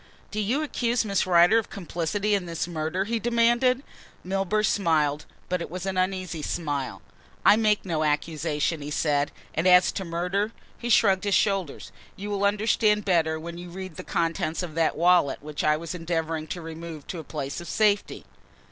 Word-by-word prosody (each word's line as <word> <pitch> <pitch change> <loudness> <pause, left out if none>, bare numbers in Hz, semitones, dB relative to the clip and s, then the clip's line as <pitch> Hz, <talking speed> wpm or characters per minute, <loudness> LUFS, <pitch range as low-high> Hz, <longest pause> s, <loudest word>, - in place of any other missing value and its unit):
"Do 215 - -3
you 240 +9 0
accuse 240 -5 0
Miss 200 -2 0
Rider 180 +5 +6
of 225 - -6
complicity 195 +3 -2
in 195 -3 0
this 170 0 -3
murder?" 165 +2 -2
he 230 +3 -2
demanded. 240 +3 +2 0.4
Milburgh 195 +3 0
smiled, 155 -7 +1 0.2
but 180 -1 -1
it - - -5
was 180 +2 -5
an 190 -1 -2
uneasy 185 -3 -1
smile. 145 -4 -3 0.4
"I - - +8
make 215 -2 +2
no 160 -4 -1
accusation," 150 +1 -1
he 145 - -5
said, 145 -1 +1 0.2
"and 165 +4 +1
as 180 0 +6
to 190 - -4
the 175 - -9
murder?" 185 +6 -1 0.3
he 240 - -4
shrugged 195 -4 +4
his 200 - +2
shoulders. 195 -7 0 0.2
"You 205 +2 -6
will 200 0 0
understand 210 0 +2
better 160 -4 +2
when 170 +2 -7
you 175 0 -8
read 185 -1 -8
the - - -7
contents 165 0 -1
of 170 -3 -6
that 165 0 +1
wallet 170 -5 +3
which 150 -1 -4
I 150 0 +3
was 165 +1 -6
endeavouring 165 -2 -2
to 175 +2 -5
remove 160 -2 -8
to 175 - -6
a - - -7
place 140 0 -5
of 175 - -9
safety." 210 -2 +1
180 Hz, 185 wpm, -26 LUFS, 160-205 Hz, 0.4 s, I